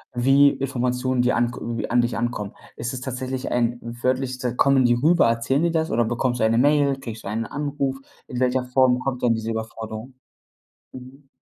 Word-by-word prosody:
wie 135 +3 +5
Informationen, 125 -1 -1
die 125 - +2
an 120 0 +1
k - - -8
irgendwie 115 -1 -4
an 120 - +3
dich 120 0 -2
ankommen. 115 -3 -3 0.2
Ist 120 +3 -4
es 130 - -5
tatsächlich 130 0 -4
ein 120 0 +1
wörtlich, 125 +2 -2
s 125 -1 -1
kommen 135 -2 +4
die 120 - +4
rüber, 155 +4 +4
erzählen 115 +6 +1
die 170 - +2
das 160 -1 0
oder 115 +1 +2
bekommst 120 +2 -1
du - - +4
eine 115 +1 +2
Mail, 140 0 +3
kriegst 115 -4 -8
du - - -4
einen 110 +2 -2
Anruf? 140 -1 -3 0.3
In 125 - -5
welcher 130 0 +1
Form 125 0 +3
kommt 125 -1 -3
dann 120 -2 +4
diese 110 0 -3
Überforderung? 110 +2 -6 0.8
Mhm. 130 +2 -12
125 Hz, 200 wpm, -23 LUFS, 120-135 Hz, 0.8 s, wie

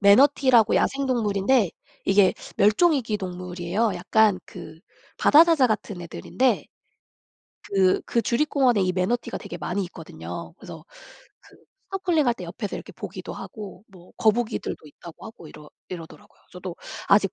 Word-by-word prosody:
매너티라고 240 +2 +5
야생동물인데 235 -6 +1 0.3
이게 195 -1 +4 0.2
멸종 215 - +4
위기 240 -7 -1
동물이에요. 180 +2 -2
약간 210 +2 +3
그 160 - -11 0.4
바다사자 320 -3 +6
같은 210 -4 -3
애들인데 250 +9 -1 1.0
그 190 -2 +2
그 235 - +1
주립공원에 255 -1 +2
이 185 0 +1
매너티가 190 +7 -1
되게 175 - -8
많이 180 +4 -2
있거든요. 175 - -8
그래서 - - -11 0.6
그 - - -20 0.3
스노클링 360 -6 +1
할 240 - +3
때 185 - -8
옆에서 190 +4 -5
이렇게 - - -10
보기도 - - -7
하고 205 -2 -9
뭐 185 -3 -17
거북이들도 220 -7 0
있다고 160 +3 -12
하고 220 -8 -12
이러 150 0 -14 0.2
이러더라고요. 165 -4 -11
저도 180 -1 -7 0.3
아직 200 -1 +4
205 Hz, 345 characters per minute, -24 LUFS, 180-245 Hz, 1.0 s, 바다사자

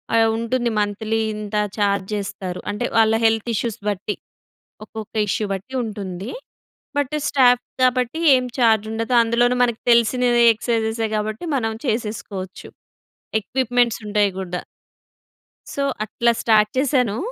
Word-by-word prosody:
ఆహ్, 225 0 +4
ఉంటుంది 240 +1 -1
మంత్లీ 215 +2 -1 0.2
ఇంత 210 0 -6 0.2
ఛార్జ్ 200 -2 +1
చేస్తారు. 195 -3 -5
అంటే 210 +4 -2
వాళ్ళ 220 0 +5
హెల్త్ 225 +1 +2
ఇష్యూస్ 230 0 -2
బట్టి 205 +1 -3 0.7
ఒక్కొక్క 220 0 -9
ఇష్యూ 215 - 0
బట్టి 195 +8 -6
ఉంటుంది. 200 -2 -5 0.7
బట్ 285 +1 -1
స్టాఫ్ 250 -3 +4 0.2
కాబట్టి 255 +4 +2 0.2
ఏం 255 - -1
ఛార్జ్ 220 -3 +3
ఉండదు. 230 +2 -1
అందులోను 240 +2 +2
మనకు 235 -2 -2
తెలిసినవె 240 +1 +4
ఎక్సర్‌సైజెసె 225 0 -1
కాబట్టి 215 +5 -3
మనం 225 -3 -1
చేసేసుకోవచ్చు 210 -4 -4 0.7
ఎక్విప్‌మెంట్స్ 245 +1 0
ఉంటాయి 205 -1 +2
గూడా. 180 -2 -4 1.1
సో, 280 - -1 0.2
అట్లా 235 +2 +1 0.5
చేశాను. 250 -5 +1
225 Hz, 120 wpm, -21 LUFS, 210-245 Hz, 1.1 s, వాళ్ళ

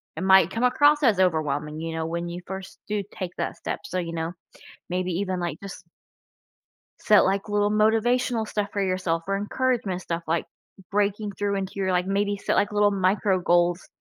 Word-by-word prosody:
it - - -5
might 190 -2 +6
come 225 +5 -3
across 290 +4 +4
as 220 -7 +4
overwhelming, 155 -4 0
you 165 0 -4
know, 160 0 -2
when 170 +1 -3
you 175 +1 -6
first 190 0 -7
do 210 -1 -1
take 185 -3 -5
that - - -2
step, - - -4
so, 185 - -3
you 170 -2 -4
know, 165 0 -2 0.6
maybe 180 +1 -1
even, 185 +1 -2
like, 170 -4 -3
just 195 -2 -9 1.2
set, 210 -1 +5
like, 195 +2 0
little 205 0 +1
motivational 225 +2 +2
stuff 210 -1 -2
for 200 - -1
yourself 185 -3 -1
or 195 0 0
encouragement 210 -3 -1
stuff, 170 -2 -4
like 165 +1 0 0.5
breaking 205 +1 0
through 200 0 -2
into 190 -1 -3
your, 190 -1 0
like 180 0 +1
maybe 200 +1 0
set, - - -1
like, 205 - +2
little 205 0 +3
micro 190 0 +1
goals 175 0 +2
190 Hz, 190 wpm, -25 LUFS, 175-205 Hz, 1.2 s, might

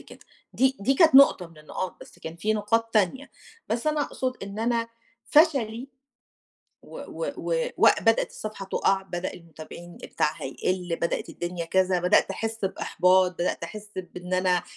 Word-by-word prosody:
كده. - - -14 0.3
دي 265 +1 +2
دي 260 +7 +2
كانت 315 0 +5
نقطة 270 -9 +7
من 165 -2 -18
النقاط 155 +4 -5
بس - - -14
كان 160 +1 -8
في 215 +5 0
نقاط 225 +2 0
تانية، 215 +7 +1 0.4
بس 235 +5 -2
أنا 305 -1 +1
أقصد 255 -2 -4
إن 200 +1 -7
أنا 230 0 0 0.4
فشلي، 270 -6 +2 1.0
و - - -11 0.3
و - - -2
و - - -1
وبدأت 225 -1 +4
الصفحة 215 -2 -7
تُقع، 195 0 +2
بدأ 180 -2 -5
المتابعين 170 +1 -11
بتاعها 150 - -2
يقل، 180 +5 -2
بدأت 170 - -1
الدنيا 175 -1 -5
كذا، 185 +1 +2
بدأت 180 +1 +3
أحس 225 -2 -3
بإحباط، 185 -1 +2
بدأت 175 -1 -2
أحس 210 +5 -8
بإن 180 0 -6
أنا 185 -1 +2
195 Hz, 155 wpm, -26 LUFS, 180-230 Hz, 1.0 s, نقطة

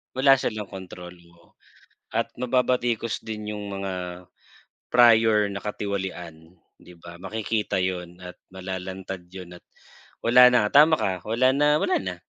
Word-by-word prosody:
wala 135 0 +5
silang 110 -5 -4
kontrol, 90 -2 -9 0.2
oo 85 - -25 0.6
at - - -1
mababatikos 120 -2 0
din 105 -1 -6
yung 105 -1 -6 0.2
mga 90 -2 -6 0.6
prior 110 -4 +4
na 100 - -5
katiwalian, 95 -5 -6 0.2
di 90 - -16
ba? 85 0 -12
Makikita 110 +2 -3
yun 90 -1 -4
at 90 - -10 0.2
malalantad 95 0 -7
yun 90 -2 -9
at - - -23 0.6
wala 125 +2 +7
na 105 -4 +3
tama 155 +3 +6
ka, 95 - -1
wala 120 +4 +2
na 150 +1 +3
wala - - +1
na. 95 -1 -5
100 Hz, 135 wpm, -24 LUFS, 90-115 Hz, 0.6 s, wala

